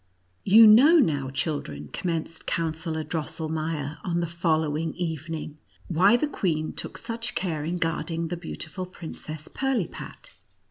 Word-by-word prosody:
You 220 +4 +8
know 260 +11 +8
now, 145 - +2
children, 130 - -3
commenced 165 -2 -3
Coun 165 -2 0
sellor 160 0 -3
Drosselmeier, 155 -1 -3
on 175 -2 0
the 170 - 0
following 160 -2 0
even 165 -2 -3
ing, 155 -1 -7 0.3
why 190 +7 +5
the 275 - +1
queen 160 - -1
took - - -5
such 230 +1 -4
care 160 -6 -1
in 170 +3 -2
guarding 165 0 -1
the 175 - -2
beautiful 180 +2 -6
Princess 155 -3 -8
Pirlipat. 265 -9 -3
165 Hz, 140 wpm, -26 LUFS, 155-180 Hz, 0.3 s, You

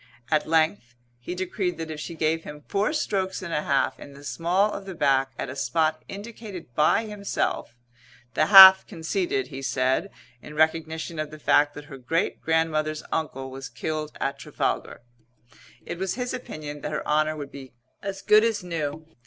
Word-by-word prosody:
At 155 -1 +2
length 160 -5 +1 0.2
he 175 +9 -6
decreed 185 -1 -2
that 160 -1 -5
if 155 - -6
she 165 +2 -6
gave 160 +1 0
him 150 0 -10
four 200 +7 +1
strokes 195 -11 -1
and 170 -3 -5
a 150 - +1
half 140 -2 0
in 140 - -11
the 140 +1 -13
small 170 - +1
of 200 - -6
the 190 - -6
back 135 -3 +2
at - - -3
a 130 - -7
spot 155 +1 0
indicated 200 - -9
by 155 - +3
himself 200 - -3 0.6
(the 155 - +2
half 190 -1 +11
conceded, 365 - -2
he 135 - -7
said, 130 +7 0 0.3
in 150 - -11
recognition 160 +1 0
of 155 -1 -2
the 155 - -10
fact 145 -1 +3
that 145 - -9
her 135 -2 -10
great 160 +7 -1
grandmother's 155 -1 0
uncle 135 -4 -3
was 135 0 -7
killed 155 +5 -4
at 140 0 -2
Trafalgar) - - -3 0.8
it 170 - -6
was 190 -1 -1
his 250 0 -3
opinion 150 - -7
that - - -4
her - - -3
honour 155 +1 +2
would 145 -2 -7
be 135 -2 -10 0.3
as 195 -1 -5
good 215 +1 +6
as 225 -4 0
new. 160 -3 -4
160 Hz, 180 wpm, -25 LUFS, 145-190 Hz, 0.8 s, half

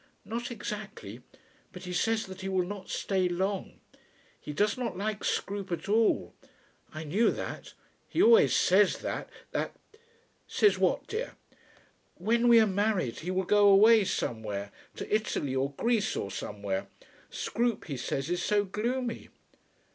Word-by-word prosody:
"Not 235 +2 -4
exactly; 210 -3 -7 0.5
but 180 - -10
he 180 -1 -5
says 225 +4 +1
that 190 0 -9
he 190 - -3
will 185 -2 +1
not 195 0 -7
stay 190 -2 0
long. 190 +2 -2 0.6
He - - -7
does 205 +7 +1
not 245 -7 -4
like 210 +1 -3
Scroope 200 -2 -2
at 170 - -3
all. 220 +2 +2 0.6
I 155 +1 -6
knew 195 +10 +2
that. - - -6 0.3
He - - -3
always 460 +4 +6
says - - +4
that, - - -4 0.2
that - - -2 0.4
" 465 - -38
"Says 420 - +4
what, - - +1
dear?" 450 +3 -4 0.8
"When 230 +6 +1
we 235 -1 +8
are 220 - +6
married 200 - 0
he 170 - -5
will 185 +1 0
go 205 +2 +5
away 215 +2 +7
somewhere, 105 - -3 0.2
to - - -1
Italy 150 -11 -1
or 135 +2 -1
Greece 225 - 0
or 100 - -3
somewhere. 100 -1 -4 0.4
Scroope 235 -1 -1
he 145 - -4
says 135 +2 -3
is 175 0 0
so 205 +2 +2
gloomy." 235 +4 -3
200 Hz, 155 wpm, -29 LUFS, 175-225 Hz, 0.8 s, we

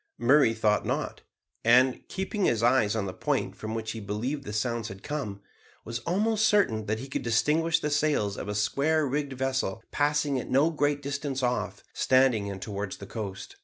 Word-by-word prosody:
Murray 120 -1 +4
thought 105 -2 +2
not, - - -3 0.4
and, 125 +2 +5
keeping 190 +1 -2
his 115 -1 +1
eyes 120 -3 +3
on 110 -3 -1
the 95 - -4
point - - -1
from 110 +1 -5
which 110 -1 -3
he 115 - -6
believed 115 +8 -3
the 105 - -5
sounds 115 +1 -1
had 95 -3 -10
come, 110 -10 -4 0.4
was 115 +1 -4
almost 215 +4 +2
certain 110 - +2
that 110 +1 0
he 130 +4 -7
could 135 - -3
distinguish 155 +8 +2
the 150 -2 -2
sails 145 -9 +1
of - - -6
a 105 - -2
square 145 +9 +1
rigged 140 0 -2
vessel 130 -5 -2
passing 145 -2 +1
at - - -7
no 145 +5 +3
great 145 -2 0
distance 140 -1 -3
off, 125 0 -1
standing 130 -6 +3
in 100 -1 -5
towards 100 -1 -5
the 100 - -9
coast. 100 -2 -7
125 Hz, 190 wpm, -28 LUFS, 110-145 Hz, 0.4 s, and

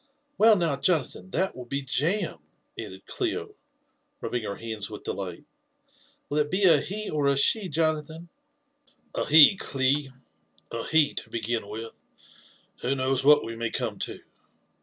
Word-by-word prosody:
'< 290 0 -46
Well, 220 0 +7
now, 165 -7 +1
Jona 155 +1 +2
than, 190 - -12
that 190 0 -1
will 125 -1 -9
be 140 +2 -3
jam!" 165 +10 -1 0.4
added - - -8
Clio, 415 +3 -3 0.7
rubbing 120 - -3
her 100 - -4
hands 110 -2 -4
with 105 - -9
delight. 90 -3 -5 0.4
" - - -34
Will 150 - 0
it 150 0 +1
be 190 +4 0
a 165 -6 +6
he 210 +3 -3
or 150 -2 0
a 140 0 +2
she, 190 +7 +2
Jonathan 155 +1 -1 0.3
?" 290 0 -47
" - - -36
A - - -2
he, 155 +5 +8
Cli, 135 -1 0 0.3
— 80 0 -37
a 115 -1 -4
he, 160 -2 +3
to - - -6
begin 115 -1 -2
with. 110 +2 -8 0.8
Who 135 +3 0
knows 130 0 0
what 150 +1 +6
we 115 - -6
may 115 0 -2
come - - -3
to? - - -3
145 Hz, 180 wpm, -26 LUFS, 120-185 Hz, 0.8 s, he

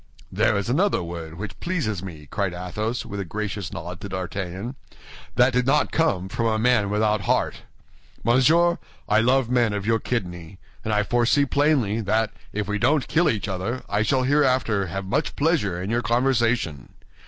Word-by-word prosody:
"There 110 -2 +2
is 100 +1 -2
another 145 - +2
word 85 -1 -7
which 95 +1 -7
pleases 135 - -2
me," 80 -6 -9
cried 100 -4 -1
Athos, 105 +7 -3
with 100 - -6
a - - -1
gracious 100 0 -4
nod 85 +2 -7
to 100 - -6
D'Artagnan. 95 +4 -4 0.6
"That 125 +1 +4
did 125 0 +1
not 145 +3 +3
come 105 - +1
from 115 +4 -1
a 110 -1 +1
man 110 -3 +2
without 105 +1 +1
a - - -8
heart. - - +1 0.7
Monsieur, 160 +9 +4 0.3
I 105 +2 +4
love 125 +1 +2
men 120 -4 +2
of 100 -1 -3
your 115 +1 +2
kidney; 90 -7 -4 0.3
and 110 - -2
I 105 0 +2
foresee 120 +6 +2
plainly 135 -7 +2
that 110 +1 +1 0.2
if 105 -1 -3
we 105 0 -1
don't 140 +5 +2
kill 165 +2 +3
each 105 -2 -1
other, 95 +7 -3
I 100 +1 0
shall 130 +4 +2
hereafter 130 -8 +2
have 95 +3 -4
much 95 - -1
pleasure 140 - +1
in 95 +4 -3
your 120 +1 +1
conversation. 120 - 0
110 Hz, 180 wpm, -24 LUFS, 95-125 Hz, 0.7 s, That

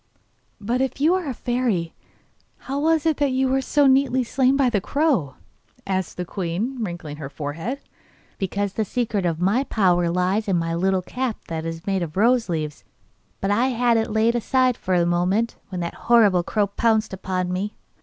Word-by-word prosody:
'But 235 +5 -1
if 265 0 -2
you 310 +5 +4
are 370 -4 -1
a - - -2
fairy, 235 -11 -1 0.6
how 275 +1 -4
was 320 +1 +2
it 320 -2 +2
that 285 -2 +1
you 260 +1 +2
were 265 +1 +1
so 290 +2 +2
nearly 265 -1 +3
slain 260 +2 +2
by 275 -2 +3
the 215 -5 +1
crow?' 260 - 0 0.5
said 190 -1 0
the 180 - -3
queen, 200 +8 -3
wrinkling 170 -6 -6
her 145 -3 -6
forehead. 160 - -5 0.6
'Because 200 +1 -2
the 220 - 0
secret 210 -4 -1
of 165 -1 -2
my 200 +9 +2
power 180 -8 +2
lies 185 +5 0
in 190 -3 +2
my 165 0 -1
little 185 +2 +1
cap 250 +2 -3
that 165 0 -3
is 165 0 -6
made 195 -2 0
of 165 0 -5
rose 235 +1 +3
leaves; 155 -3 -3 0.6
but 195 - 0
I 235 +5 +3
had 245 -2 +2
laid 220 +1 +2
it 240 0 +1
aside 255 +1 +2
for 185 -4 0
the 170 - +2
moment, 180 +6 +1
when 180 -2 -4
that 170 - -3 0.2
horrible 210 -7 +6
crow 205 +4 0
pounced 220 +1 +1
upon 185 -1 -2
me. 200 +3 -3
205 Hz, 190 wpm, -23 LUFS, 180-255 Hz, 0.6 s, horrible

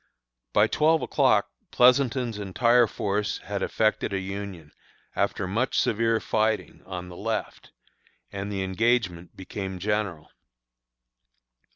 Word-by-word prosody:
By 105 - +5
twelve 155 +8 +2
o'clock - - +2 0.2
Pleasonton's 125 -3 +3
entire 115 +4 +3
force 100 0 -2
had - - -5
effected 110 -1 0
a - - +1
union, 95 -5 -6 0.4
after - - 0
much 115 +7 0
severe 115 +1 +2
fighting, 110 0 -1
on 90 -1 -6
the 90 - -10
left, 110 +3 -4 0.6
and 100 +1 -5
the 95 -1 -2
engagement 95 -3 0
became 95 0 -5
general. 100 -4 -2
105 Hz, 110 wpm, -26 LUFS, 95-115 Hz, 0.6 s, By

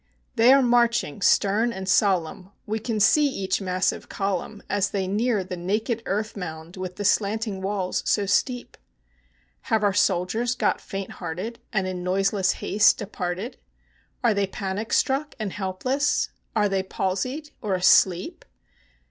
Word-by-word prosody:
They 235 +3 +6
are 275 0 +6
marching, 235 -7 +2
stern 210 +5 +3
and 190 -4 -6
solemn; 185 -2 +1 0.2
we 220 +1 -2
can 220 0 -2
see 290 +8 +5
each 195 -7 -2
massive 185 -1 -1
column 195 +1 -3
As 200 -1 0
they 195 -2 -2
near 210 +2 0
the 185 0 -6
naked 215 +6 -1
earth 215 +3 -2
mound 165 -3 -7
with 185 -1 -6
the 205 - -4
slanting 210 0 0
walls 190 -1 -1
so 205 - +2
steep. 245 +5 -1 0.9
Have 220 -1 +2
our 200 -1 +3
soldiers 205 +6 +1
got - - 0
faint 195 -1 -6
hearted, 185 +7 -6
and 195 -4 0
in 185 -1 -4
noiseless 195 +1 +1
haste 205 +1 +3
departed? 195 +2 -4 0.7
Are 235 -3 +4
they 200 -1 0
panic 195 +3 -4
struck 280 +3 +1
and 210 -4 -4
helpless? 255 +10 0 0.3
Are 210 -2 +3
they 195 -1 0
palsied 225 +11 -3
or 205 -4 0
asleep? 180 0 +3
200 Hz, 150 wpm, -24 LUFS, 185-225 Hz, 0.9 s, They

